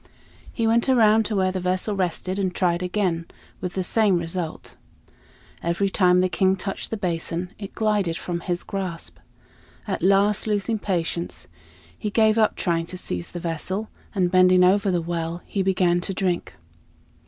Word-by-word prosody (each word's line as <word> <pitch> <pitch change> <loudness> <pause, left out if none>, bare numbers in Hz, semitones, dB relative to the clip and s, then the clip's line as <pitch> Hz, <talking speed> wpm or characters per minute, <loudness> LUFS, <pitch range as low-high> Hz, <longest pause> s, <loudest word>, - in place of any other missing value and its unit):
He 230 - -1
went 235 +3 +2
around 220 -3 +5
to 215 - -2
where 190 -1 +2
the 185 - -3
vessel 185 +3 0
rested 185 +1 -2
and 185 -2 -1
tried 175 -1 +1
again, 180 -3 -1 0.3
with 180 -1 -5
the 190 - 0
same 205 0 +3
result. 170 -1 -4 0.9
Every 170 +4 0
time 180 -2 +4
the 185 - +3
King 190 +1 +2
touched 195 +1 -4
the 225 - -3
basin 175 -1 -3
it 200 -2 -8
glided 205 -6 +1
from 175 -1 -4
his 175 0 -2
grasp. 185 -4 -5 0.7
At - - -2
last, 200 +3 +3
losing 215 +1 0
patience, 170 -3 -2 0.5
he 210 - -4
gave 220 +1 +3
up 215 - +3
trying 165 -2 -1
to 185 - -7
seize 90 - -3
the 175 - -6
vessel, 180 +6 -3 0.3
and 180 -3 +1
bending 185 0 +6
over 200 +2 +4
the 175 -2 0
well, 170 0 -3
he 200 - -2
began 185 -2 +2
to 190 +1 -4
drink. 180 -2 -1
185 Hz, 165 wpm, -24 LUFS, 175-200 Hz, 0.9 s, bending